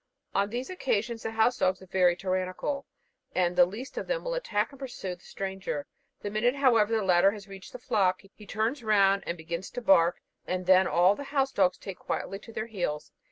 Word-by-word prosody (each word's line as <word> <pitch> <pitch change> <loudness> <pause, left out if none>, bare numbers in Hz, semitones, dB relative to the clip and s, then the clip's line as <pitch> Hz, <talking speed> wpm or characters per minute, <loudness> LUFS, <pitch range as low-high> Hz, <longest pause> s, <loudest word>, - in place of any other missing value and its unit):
On 200 +1 +1
these 245 - -4
occasions 235 - -1
the - - -3
house 225 +2 +2
dogs 185 0 +2
are 190 - -13
very 180 -1 +3
tyrannical, 185 +9 -2 0.5
and 180 -1 +2
the 180 -1 +6
least 225 +8 -6
of - - -6
them - - -1
will - - -2
attack 230 - -1
and 275 - -14
pursue 245 -9 -5
the 180 - -15
stranger. 190 -6 -4 0.4
The 205 - -3
minute, 240 +5 +2
however, 230 -5 +3
the 220 - +1
latter 180 0 +5
has 205 -2 -10
reached 195 -1 -11
the - - -7
flock, 200 -7 +1
he 210 - -15
turns 225 +6 -1
round 200 -2 +4
and 170 - -2
begins 170 +3 -5
to 245 - -6
bark, 175 -5 +4 0.3
and 185 0 -2
then 185 0 +6
all 180 +3 +4
the 285 +7 -7
house 275 -1 0
dogs 185 -5 +2
take 195 -2 -8
very - - -24
quietly 195 - -3
to 230 - -13
their 220 -1 -3
heels. 175 -9 -4
200 Hz, 215 wpm, -28 LUFS, 185-235 Hz, 0.5 s, the